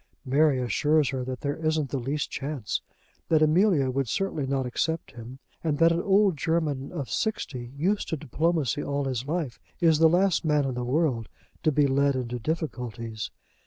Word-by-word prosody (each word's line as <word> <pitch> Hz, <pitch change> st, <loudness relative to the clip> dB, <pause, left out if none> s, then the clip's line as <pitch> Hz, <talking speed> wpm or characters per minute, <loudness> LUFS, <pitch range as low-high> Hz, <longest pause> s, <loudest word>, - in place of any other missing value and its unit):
Mary 140 Hz, +1 st, +3 dB
assures 145 Hz, +5 st, +2 dB
her 130 Hz, -2 st, -2 dB
that 130 Hz, 0 st, -5 dB
there 145 Hz, 0 st, -2 dB
isn't 155 Hz, -3 st, 0 dB
the 140 Hz, -, -1 dB
least 140 Hz, +4 st, -2 dB
chance, 135 Hz, -6 st, -3 dB, 0.5 s
that 155 Hz, -1 st, +4 dB
Amelia 155 Hz, -4 st, +3 dB
would 135 Hz, 0 st, -1 dB
certainly 175 Hz, -, -1 dB
not 135 Hz, -1 st, 0 dB
accept 160 Hz, +6 st, -2 dB
him, 120 Hz, +2 st, -10 dB, 0.3 s
and 155 Hz, -3 st, 0 dB
that 165 Hz, +1 st, +5 dB
an 170 Hz, +1 st, +1 dB
old 195 Hz, -3 st, +3 dB
German 150 Hz, -4 st, -1 dB
of 145 Hz, -7 st, -4 dB
sixty, 130 Hz, -, -3 dB
used 195 Hz, +7 st, 0 dB
to 160 Hz, -, -1 dB
diplomacy 150 Hz, -1 st, 0 dB
all 140 Hz, -1 st, -2 dB
his 130 Hz, -1 st, -2 dB
life, 155 Hz, -6 st, -2 dB, 0.2 s
is 160 Hz, -3 st, +4 dB
the 160 Hz, 0 st, +7 dB
last 180 Hz, +1 st, +2 dB
man 150 Hz, -3 st, +2 dB
in 135 Hz, -, -1 dB
the 125 Hz, 0 st, -3 dB
world 125 Hz, -4 st, 0 dB, 0.3 s
to 155 Hz, -, +3 dB
be 145 Hz, 0 st, +3 dB
led 140 Hz, 0 st, +2 dB
into 125 Hz, -1 st, -3 dB
difficulties. 120 Hz, -7 st, -4 dB
145 Hz, 180 wpm, -27 LUFS, 130-160 Hz, 0.5 s, the